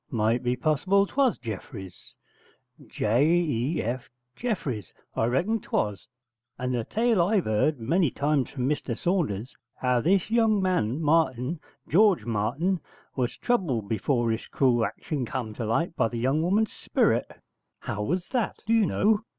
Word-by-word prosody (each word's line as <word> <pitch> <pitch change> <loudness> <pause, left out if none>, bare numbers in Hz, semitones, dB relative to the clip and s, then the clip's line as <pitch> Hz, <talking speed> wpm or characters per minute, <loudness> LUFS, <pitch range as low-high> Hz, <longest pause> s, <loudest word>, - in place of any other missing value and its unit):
'Might 115 +1 +1
be 125 0 0
possible 160 +9 +2
'twas 260 +3 +1
Jeffreys 100 -5 -8 0.7
J 115 +6 +1
e 155 -4 +1
f 125 +2 -4 0.3
Jeffreys. 145 - -3 0.2
I - - +1
reckon 180 - +1
'twas, 105 - -2 0.5
and 125 0 -2
the 120 -2 0
tale 225 - +2
I've 195 +2 +2
'eard 115 +7 +1
many 160 +8 +2
times 140 0 0
from 130 -2 -2
Mr 135 -5 -2
Saunders, 140 - -1 0.2
how 125 -1 +1
this 190 - +2
young 225 -3 +3
man 170 - 0
Martin 150 -1 +1 0.3
George 200 +1 +4
Martin 140 - 0 0.4
was 125 -2 -1
troubled 155 - 0
before 115 +2 +1
his 110 - -3
crule 125 -4 +2
action 145 +3 -3
come 120 -2 -4
to 115 0 -4
light 165 +10 0
by - - +2
the 120 +1 -5
young 135 +6 +1
woman's 205 +6 +1
sperit.' - - 0 0.4
'How 105 - -4
was 175 - -1
that, 245 -5 -1
do 225 - +1
you 225 -4 +4
know?' 215 +1 +2
140 Hz, 150 wpm, -26 LUFS, 115-185 Hz, 0.7 s, George